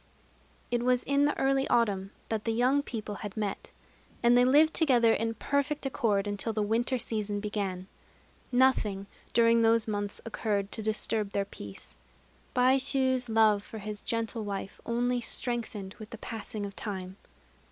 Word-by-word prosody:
It 240 -1 +1
was 250 0 +2
in 280 +1 +2
the 295 - 0
early 270 0 +2
autumn 200 -5 +1 0.2
that 220 -1 -2
the 225 - +1
young 255 +5 +3
people 220 -6 -5
had 205 0 -6
met; 205 -2 -3 0.5
and 240 +1 +6
they 245 - +6
lived 300 +5 +5
together 245 -8 +4
in 225 0 -1
perfect 280 +4 -1
accord 210 -6 +1
until 205 +2 -2
the 215 -1 0
winter 235 +5 +1
season 210 -3 -2
began. 200 -3 -3 0.7
Nothing, 245 -6 +2 0.3
during 230 0 +4
those 225 0 +3
months, 205 -1 -3
occurred 205 -3 -2
to - - -4
disturb 215 -1 -1
their 200 - 0
peace. 100 - -11 0.6
Baishû's 260 0 +2
love 215 -2 +4
for 220 - -9
his 210 0 -6
gentle 230 0 -2
wife 200 -1 -5
only 245 +1 0
strengthened 225 -6 -2
with 215 -1 -9
the 230 - -8
passing 215 -2 -5
of 200 - -8
time. 190 -3 -5
225 Hz, 155 wpm, -29 LUFS, 205-245 Hz, 0.7 s, and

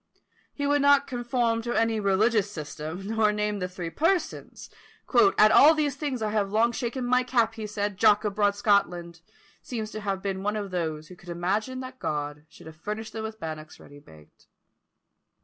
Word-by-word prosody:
He 285 - -4
would 290 0 +2
not 285 0 +5
conform 240 -3 -1
to 240 +1 -3
any 225 -1 +1
religious 205 +1 +2
system, 160 +1 -7
nor 220 0 +2
name 210 0 -2
the 180 - -2
three 180 -2 -6
Persons, 330 - -2 0.7
"At 215 0 +6
all 310 +3 +7
these 295 -3 0
things 275 -5 -3
I 210 - -1
have 210 -2 0
long 225 +3 +3
shaken 245 +1 -3
my 250 +1 +3
cap," 235 -3 +1
he 220 -2 -6
said. 205 -1 -3
"Jock 210 0 +4
of 210 -2 -1
broad 205 -1 +2
Scotland" 175 -5 0 0.4
seems 220 -3 -5
to 215 - -6
have 195 -2 -3
been 195 -1 -2
one 210 +2 -1
of 205 -2 -4
those 160 -3 -3
who 180 -1 -11
imagine 205 +9 -2
that 260 0 -9
God 150 0 -4
should - - -16
have 160 -1 -11
furnished 210 +6 -6
them 220 - -4
with 220 0 -6
bannocks 155 -1 -7
ready 145 0 -14
baked. 80 - -19
210 Hz, 185 wpm, -26 LUFS, 180-235 Hz, 0.7 s, all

